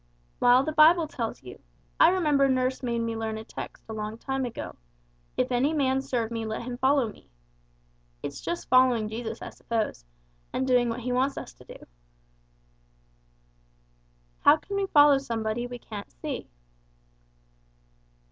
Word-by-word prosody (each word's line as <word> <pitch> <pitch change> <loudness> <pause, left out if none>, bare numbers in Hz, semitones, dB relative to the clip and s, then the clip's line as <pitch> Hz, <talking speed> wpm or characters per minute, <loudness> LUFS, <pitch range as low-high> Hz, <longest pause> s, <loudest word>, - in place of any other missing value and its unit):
"Well, 245 +2 +5
the 310 - -2
Bible 315 +2 +6
tells 235 - -5
you. 125 - -11 0.4
I - - +8
remember 300 -7 +3
nurse 255 0 0
made 240 -2 -1
me 230 0 -2
learn 220 -1 -3
a 220 - -7
text - - -9
a 220 - -6
long 215 0 -5
time 270 +2 -2
ago, 240 - -6 0.6
'If - - 0
any 260 +5 +2
man 265 -3 +1
serve 235 -4 -2
me 230 -1 -3
let 220 +1 -4
him 245 0 -6
follow 265 -1 +3
me.' - - -20 0.9
It's 140 -1 -5
just 345 - -4
following 250 -4 +4
Jesus 225 +1 -5
I - - -7
suppose, 220 - -3 0.5
and 260 - 0
doing 250 -2 +3
what 230 +2 -3
He 250 +2 -3
wants 260 +3 +1
us - - -7
to - - -18
do." - - -12 2.5
"How 290 +2 +6
can 400 +5 -7
we 395 0 0
follow 290 -4 +6
somebody 230 -2 -3
we 245 0 -7
can't 215 -3 -9
see?" - - -6
250 Hz, 155 wpm, -27 LUFS, 225-275 Hz, 2.5 s, I